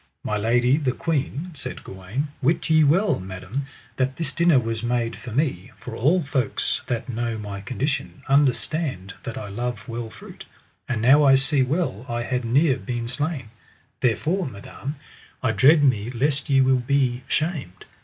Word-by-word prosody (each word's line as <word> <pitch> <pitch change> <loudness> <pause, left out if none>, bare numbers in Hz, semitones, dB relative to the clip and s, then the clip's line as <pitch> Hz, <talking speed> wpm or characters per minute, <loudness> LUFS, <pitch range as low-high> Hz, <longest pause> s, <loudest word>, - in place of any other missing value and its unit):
My 105 - -1
lady, 120 +5 +3
the 135 -5 0
queen, 155 +3 -2
said 145 - -7
Gawaine, 100 +11 -4
wit 160 +4 +1
ye 155 0 +6
well, 170 +2 +3
madam, 95 +9 -5 0.3
that 130 0 0
this 165 - -2
dinner 170 -4 +4
was 115 -2 -1
made 120 -1 -1
for 115 +4 -9
me, 125 - -1
for 120 - -8
all 160 +10 +3
folks 135 -3 -1
that 120 +1 -2
know 115 -2 -2
my 100 -2 -6
condition 135 +4 -3
understand 135 - +1
that 120 - -6
I 105 - -5
love 120 +5 -4
well 115 -1 -4
fruit, - - -12 0.4
and 115 -4 -1
now 140 +5 +7
I 135 -1 +7
see 135 +1 +2
well 130 - -1
I 120 0 -1
had 125 +1 -1
near 135 +4 +3
been 120 -2 -4
slain; 135 -2 -3 0.5
therefore, 160 +10 +1
madam, 130 +6 -7 0.5
I - - +3
dread 150 +3 +5
me 120 -5 +2
lest 135 +3 -1
ye 135 -1 +5
will 130 -1 +4
be 125 -1 +1
shamed. 155 - -2
130 Hz, 165 wpm, -24 LUFS, 115-145 Hz, 0.5 s, now